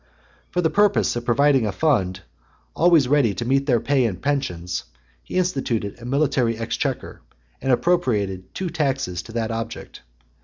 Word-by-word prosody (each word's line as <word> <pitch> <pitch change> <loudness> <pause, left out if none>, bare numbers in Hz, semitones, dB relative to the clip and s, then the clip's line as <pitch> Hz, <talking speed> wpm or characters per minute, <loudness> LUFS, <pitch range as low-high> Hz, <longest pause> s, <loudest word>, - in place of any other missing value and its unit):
For 180 - 0
the 160 - +1
purpose 205 -7 +3
of 120 0 -4
providing 130 0 +3
a - - -1
fund 95 - +1 0.5
always 165 -5 +4
ready 130 -7 +3
to 120 - -3
meet 135 +3 +1
their 120 -4 +3
pay 130 +2 +2
and 95 -6 -2
pensions, 90 -12 -2 0.4
he - - -5
instituted 125 - -1
a - - -9
military 130 -4 +1
exchequer, 115 0 -3 0.4
and 135 - 0
appropriated 110 - +1
new 185 -3 -2
taxes 135 - -1
to - - -12
that 115 -1 -1
object. 115 0 -6
125 Hz, 155 wpm, -22 LUFS, 110-145 Hz, 0.5 s, always